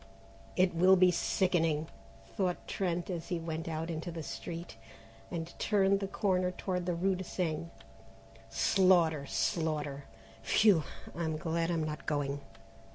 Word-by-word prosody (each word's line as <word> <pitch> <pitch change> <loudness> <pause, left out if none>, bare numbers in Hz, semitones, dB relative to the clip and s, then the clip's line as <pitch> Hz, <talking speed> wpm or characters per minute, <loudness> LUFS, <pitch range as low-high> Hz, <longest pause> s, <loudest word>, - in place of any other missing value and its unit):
"It 185 -1 +3
will 185 +3 +6
be 180 -1 +6
sickening," 165 -4 +1 0.5
thought 180 -3 -1
Trent 180 -1 -1
as 170 -2 -4
he 175 - -1
went 165 0 -4
not 165 +1 -3
into 165 +2 -4
the 165 -1 -5
street 165 +8 -6 0.5
and 170 -1 -5
turned 200 -2 +3
the 195 - -2
corner 185 -2 +1
toward 180 -1 -3
the 175 - +1
rue 190 +3 +2
de 185 0 -4
Seine; 165 -3 -2 0.8
"slaughter, 165 - +3
slaughter, 145 - -1 0.4
phew! 175 - +4 0.3
I'm 160 -1 -1
glad 165 +1 -1
I'm 165 -2 0
not 155 0 -5
going." 145 -1 -1
170 Hz, 140 wpm, -32 LUFS, 155-185 Hz, 0.8 s, will